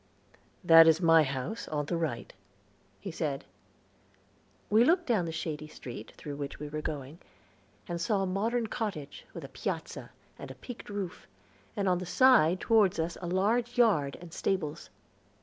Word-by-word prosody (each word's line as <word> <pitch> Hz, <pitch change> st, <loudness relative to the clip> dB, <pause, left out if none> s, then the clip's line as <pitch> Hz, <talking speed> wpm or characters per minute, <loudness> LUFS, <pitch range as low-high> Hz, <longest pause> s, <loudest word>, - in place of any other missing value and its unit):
"That 165 Hz, -1 st, +8 dB
is 160 Hz, 0 st, +5 dB
my 165 Hz, -2 st, +6 dB
house, 140 Hz, -, -3 dB
on 150 Hz, -1 st, -2 dB
the 170 Hz, -, -2 dB
right," 155 Hz, -8 st, -3 dB, 0.7 s
he 195 Hz, -, -6 dB
said. 150 Hz, -4 st, -3 dB, 1.2 s
We 220 Hz, +3 st, +5 dB
looked 345 Hz, +6 st, +3 dB
down 220 Hz, -, +1 dB
the 165 Hz, -, -4 dB
shady 155 Hz, -2 st, -4 dB
street 130 Hz, -4 st, -9 dB
through 145 Hz, -1 st, -7 dB
which 140 Hz, -1 st, -5 dB
we 150 Hz, 0 st, -6 dB
were 155 Hz, +1 st, -4 dB
going, 150 Hz, +1 st, -6 dB, 0.7 s
and 170 Hz, -1 st, -4 dB
saw 195 Hz, +2 st, +1 dB
a -, -, 0 dB
modern 225 Hz, +6 st, 0 dB
cottage, 205 Hz, -, -5 dB
with -, -, -7 dB
a -, -, -7 dB
piazza, -, -, -5 dB, 0.3 s
and -, -, -9 dB
peaked 245 Hz, -4 st, -9 dB
roof, 200 Hz, -3 st, -5 dB, 0.5 s
and 200 Hz, -1 st, 0 dB
on 180 Hz, -1 st, +2 dB
the 180 Hz, -, -6 dB
side 185 Hz, -5 st, +5 dB
toward 210 Hz, -6 st, +3 dB
us 165 Hz, +1 st, -1 dB
a 175 Hz, -, -4 dB
large 225 Hz, +7 st, 0 dB
yard, 175 Hz, -, +3 dB
and 170 Hz, -2 st, -12 dB
stables. 165 Hz, -5 st, -2 dB
175 Hz, 165 wpm, -30 LUFS, 155-210 Hz, 1.2 s, That